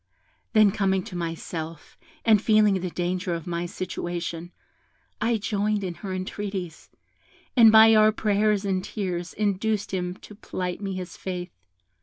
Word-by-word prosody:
Then 215 Hz, -3 st, +6 dB
coming 190 Hz, -1 st, +1 dB
to 210 Hz, -5 st, -9 dB
myself, 165 Hz, -1 st, -5 dB, 0.3 s
and 215 Hz, -3 st, +5 dB
feeling 210 Hz, -4 st, +4 dB
the 180 Hz, -, -2 dB
danger 175 Hz, 0 st, -2 dB
of 165 Hz, -, -6 dB
my 175 Hz, 0 st, -3 dB
situation, 175 Hz, -2 st, -5 dB, 0.7 s
I 230 Hz, +1 st, +2 dB
joined 210 Hz, 0 st, -1 dB
in 180 Hz, -2 st, -3 dB
her 195 Hz, -, -5 dB
entreaties, 185 Hz, -2 st, -5 dB, 0.7 s
and 230 Hz, -3 st, +8 dB
by 220 Hz, 0 st, +8 dB
our 215 Hz, 0 st, +6 dB
prayers 210 Hz, -1 st, +1 dB
and 190 Hz, -2 st, 0 dB
tears 180 Hz, -5 st, -4 dB
induced 210 Hz, 0 st, -1 dB
him 180 Hz, -1 st, -2 dB
to 210 Hz, -, -13 dB
plight 180 Hz, -3 st, -5 dB
me 195 Hz, -2 st, -3 dB
his 180 Hz, -2 st, -7 dB
faith. 180 Hz, -1 st, -5 dB
190 Hz, 145 wpm, -25 LUFS, 175-210 Hz, 0.7 s, and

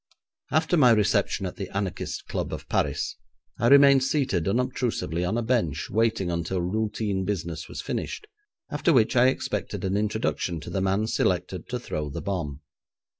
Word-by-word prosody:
After 160 Hz, +3 st, +2 dB
my 130 Hz, -5 st, +6 dB
reception 105 Hz, -3 st, +2 dB
at 90 Hz, -, -5 dB
the 95 Hz, -, -5 dB
anarchists' 100 Hz, -2 st, -3 dB
club -, -, -3 dB
of -, -, -6 dB
Paris, -, -, -1 dB, 0.4 s
I 115 Hz, -, +3 dB
remained 140 Hz, 0 st, +7 dB
seated 130 Hz, -, 0 dB
unobtrusively 120 Hz, -, -1 dB
on 95 Hz, +6 st, 0 dB
a 120 Hz, -, 0 dB
bench 110 Hz, -, 0 dB
waiting 110 Hz, -4 st, +1 dB
until 85 Hz, +2 st, -2 dB
routine 105 Hz, +1 st, -1 dB
business 85 Hz, -4 st, -3 dB
was -, -, -5 dB
finished, 425 Hz, -, -4 dB, 0.5 s
after 170 Hz, -, +2 dB
which 115 Hz, -3 st, +3 dB
I 125 Hz, +1 st, +6 dB
expected 130 Hz, -, -2 dB
an 95 Hz, +1 st, 0 dB
introduction 105 Hz, -5 st, -1 dB
to -, -, -8 dB
the 95 Hz, -, -1 dB
man 95 Hz, +3 st, +1 dB
selected 90 Hz, -4 st, -1 dB
to 125 Hz, -, -1 dB
throw 75 Hz, -10 st, -4 dB
the 70 Hz, -, -5 dB
bomb. 80 Hz, -8 st, -3 dB
100 Hz, 165 wpm, -26 LUFS, 90-120 Hz, 0.5 s, remained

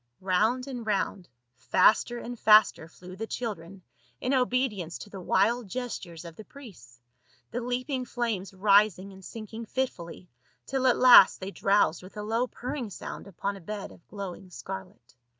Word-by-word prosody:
Round 215 Hz, +7 st, +1 dB
and 255 Hz, -4 st, -6 dB
round, 200 Hz, -, -2 dB, 0.2 s
faster 215 Hz, -, +3 dB
and 240 Hz, 0 st, -7 dB
faster 215 Hz, -6 st, +5 dB
flew 180 Hz, +2 st, -12 dB
the 220 Hz, +3 st, -5 dB
children 195 Hz, -6 st, -6 dB, 0.4 s
in 255 Hz, -, -1 dB
obedience 250 Hz, -9 st, 0 dB
to 205 Hz, -, -11 dB
the 195 Hz, -, -8 dB
wild 215 Hz, +6 st, +1 dB
gestures 190 Hz, -8 st, -6 dB
of 165 Hz, -1 st, -10 dB
the 215 Hz, -, -9 dB
priests, 175 Hz, -, -14 dB, 0.5 s
the 245 Hz, -, -3 dB
leaping 250 Hz, +2 st, -2 dB
flames 230 Hz, -6 st, -3 dB
rising 195 Hz, 0 st, +3 dB
and 190 Hz, 0 st, -14 dB
sinking 225 Hz, +2 st, -8 dB
fitfully, 185 Hz, -9 st, -4 dB, 0.4 s
till 265 Hz, -1 st, 0 dB
at 250 Hz, -, +4 dB
last 245 Hz, -6 st, +8 dB
they 190 Hz, +1 st, -6 dB
drowsed 195 Hz, -4 st, +2 dB
with 185 Hz, +3 st, -13 dB
a 210 Hz, -, -4 dB
low 225 Hz, +4 st, 0 dB
purring 250 Hz, -1 st, -5 dB
sound 200 Hz, -, -8 dB
upon 200 Hz, +1 st, -4 dB
a 195 Hz, -, -11 dB
bed 205 Hz, +4 st, -6 dB
of -, -, -18 dB
glowing 195 Hz, -2 st, -8 dB
scarlet. 190 Hz, 0 st, -9 dB
210 Hz, 160 wpm, -28 LUFS, 185-245 Hz, 0.5 s, last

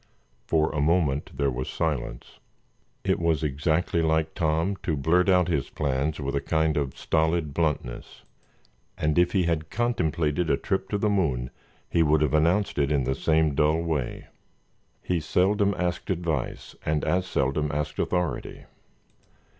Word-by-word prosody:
For 80 Hz, -1 st, +2 dB
a 75 Hz, -, 0 dB
moment 75 Hz, -3 st, +1 dB
there 70 Hz, -1 st, +1 dB
was 65 Hz, +1 st, -4 dB
silence. 70 Hz, -6 st, -3 dB, 0.6 s
It -, -, +1 dB
was 80 Hz, -3 st, +1 dB
exactly 80 Hz, +4 st, 0 dB
like 80 Hz, 0 st, +1 dB
Tom 85 Hz, +3 st, 0 dB
to 80 Hz, -5 st, -2 dB
blurt 90 Hz, +7 st, +2 dB
out 90 Hz, -2 st, +4 dB
his 75 Hz, -7 st, -1 dB
plans 70 Hz, +2 st, -1 dB
with 70 Hz, 0 st, -3 dB
a 70 Hz, -, 0 dB
kind 80 Hz, +2 st, +1 dB
of 70 Hz, -3 st, -2 dB
stolid 80 Hz, -2 st, 0 dB
bluntness, 75 Hz, -8 st, -3 dB, 0.7 s
and 75 Hz, +2 st, +1 dB
if 90 Hz, 0 st, +3 dB
he 95 Hz, -3 st, +3 dB
had 80 Hz, -2 st, -1 dB
contemplated 85 Hz, -8 st, 0 dB
a -, -, +3 dB
trip 95 Hz, 0 st, -2 dB
to 105 Hz, -, 0 dB
the 105 Hz, -, 0 dB
moon 75 Hz, -12 st, 0 dB, 0.4 s
he 85 Hz, -, +1 dB
would 75 Hz, -1 st, +3 dB
have 75 Hz, -2 st, 0 dB
announced 85 Hz, +4 st, +2 dB
it 70 Hz, +1 st, +1 dB
in 70 Hz, -3 st, +2 dB
the 65 Hz, +2 st, 0 dB
same 80 Hz, +1 st, +2 dB
dull 75 Hz, +3 st, +2 dB
way. 80 Hz, -6 st, -2 dB, 0.8 s
He 90 Hz, -2 st, 0 dB
seldom 100 Hz, +5 st, +2 dB
asked 90 Hz, -1 st, -2 dB
advice 85 Hz, -7 st, -3 dB
and 75 Hz, -1 st, 0 dB
as 90 Hz, 0 st, +1 dB
seldom 70 Hz, 0 st, 0 dB
asked 75 Hz, 0 st, -3 dB
authority. 90 Hz, -4 st, -2 dB
80 Hz, 155 wpm, -26 LUFS, 75-85 Hz, 0.8 s, out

